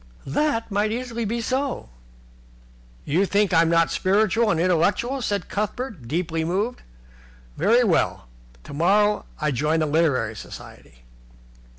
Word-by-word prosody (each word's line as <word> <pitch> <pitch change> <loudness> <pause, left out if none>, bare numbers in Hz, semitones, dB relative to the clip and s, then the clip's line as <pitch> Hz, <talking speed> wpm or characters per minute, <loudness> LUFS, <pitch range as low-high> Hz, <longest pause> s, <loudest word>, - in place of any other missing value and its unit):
"That 230 - -1
might 205 +2 +1
easily 235 -1 -3
be 235 +3 -2
so." 260 - -2 1.2
"You 180 +7 +1
think 200 -1 +1
I'm 165 0 +4
not 165 0 +3
spiritual 215 +3 +2
and 165 - +1
intellectual," 200 +10 +1
said 205 -4 -2
Cuthbert, 210 - -4
deeply 165 +2 -1
moved. 200 +9 -2 0.7
"Very 225 +10 +3
well. 180 - +1 0.4
Tomorrow 205 +8 +1
I 150 -1 0
join 150 +5 0
the 155 - +1
Literary 145 -8 +1
Society." - - -12
195 Hz, 120 wpm, -23 LUFS, 160-225 Hz, 1.2 s, I'm